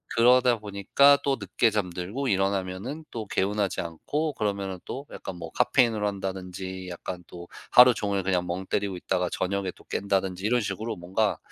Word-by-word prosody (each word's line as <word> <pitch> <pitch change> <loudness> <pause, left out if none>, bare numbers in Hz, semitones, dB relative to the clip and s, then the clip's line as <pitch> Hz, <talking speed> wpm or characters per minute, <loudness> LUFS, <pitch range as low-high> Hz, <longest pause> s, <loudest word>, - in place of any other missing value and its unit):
그러다 125 +1 +5
보니까 105 +8 +4
또 140 -1 +1
늦게 100 +3 +2
잠들고 100 +5 -2
일어나면은 95 +8 -1
또 110 -3 -5
개운하지 100 0 0
않고 145 - -3
그러면은 100 -5 -2
또 140 +2 -6
약간 - - -7
뭐 85 -2 -8
카페인을 120 -3 +2
한다든지 95 -2 -4
약간 90 0 -6
또 85 -1 -10 0.2
하루 125 0 +8
종일 100 -3 -1
그냥 90 -1 0
멍 90 +2 -3
때리고 100 -1 -1
있다가 90 0 -1
저녁에 95 0 -1
또 - - -18
깬다든지 95 -2 -1
이런 120 +2 +2
식으로 110 +2 -3
뭔가 95 +4 0
100 Hz, 370 characters per minute, -27 LUFS, 95-115 Hz, 0.2 s, 하루